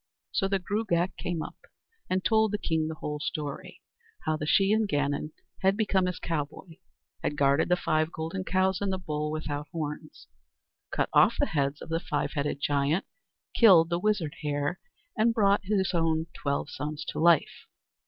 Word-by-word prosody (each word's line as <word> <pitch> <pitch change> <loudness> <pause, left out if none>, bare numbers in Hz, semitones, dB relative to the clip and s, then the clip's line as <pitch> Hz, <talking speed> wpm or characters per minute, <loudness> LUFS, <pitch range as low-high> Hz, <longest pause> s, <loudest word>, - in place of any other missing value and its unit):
So 195 - +1
the 195 0 +1
Gruagach 190 -2 -1
came 170 -3 -3
up - - -9 0.5
and 185 0 0
told 220 -2 +3
the 210 - 0
king 160 -5 -1
the 160 - -4
whole 150 -1 -4
story, 145 -1 -5 0.4
how 155 - +1
the 150 -1 -4
Shee 195 +5 +4
an 220 -1 +2
Gannon 145 -2 -1 0.3
had 195 +1 +3
become 195 -4 +2
his 180 - -3
cowboy, 160 +1 -4 0.4
had 145 - -1
guarded 140 +3 +3
the 180 - +5
five 155 -2 0
golden 165 +4 -4
cows 185 0 +1
and 200 -1 0
the 190 - -1
bull 150 -4 -3
without 150 -1 -4
horns, 155 -1 -6 0.6
cut - - -1
off - - +6
the - - +4
heads 140 -1 -1
of - - -11
the 165 0 0
five 145 -3 -2
headed 145 -1 -2
giant, 145 +5 +1 0.5
killed 180 -7 +6
the 170 - +1
wizard 185 -7 0
hare, 145 +2 -1 0.4
and 225 +1 +2
brought 200 -2 +3
his 195 -1 +1
own 160 -1 +1
twelve 140 0 -2
sons 150 +1 -5
to - - -4
life. 170 -1 +3
165 Hz, 175 wpm, -28 LUFS, 150-190 Hz, 0.6 s, off